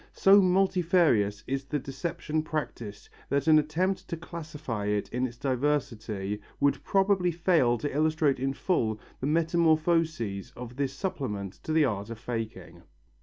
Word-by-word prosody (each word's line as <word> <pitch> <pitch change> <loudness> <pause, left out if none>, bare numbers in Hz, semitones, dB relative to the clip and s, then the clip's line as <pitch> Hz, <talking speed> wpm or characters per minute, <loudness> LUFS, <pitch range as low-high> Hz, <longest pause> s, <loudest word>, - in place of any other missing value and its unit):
So 200 +1 +6
multifarious 180 - +2
is 135 +1 -3
the 150 - -2
deception 150 +3 -3
practised 120 -10 -5 0.2
that 140 0 +1
an 155 -1 +7
attempt 185 +5 -1
to 170 - -4
classify 150 -10 -5
it 105 0 0
in 125 +1 -1
its 120 -1 -12
diversity 120 -7 -1 0.2
would 140 0 +1
probably 195 -2 +2
fail 165 -8 +2
to 145 +2 -4
illustrate 155 -3 +2
in 135 +1 -1
full 115 - 0 0.2
the 130 - -2
metamorphoses 160 - +1
of 125 0 -8
this 135 0 -1
supplement 105 - -4
to - - -3
the 155 -1 +4
art 105 -4 -2
of 115 - -6
faking. 115 -1 -6
145 Hz, 145 wpm, -28 LUFS, 120-165 Hz, 0.2 s, an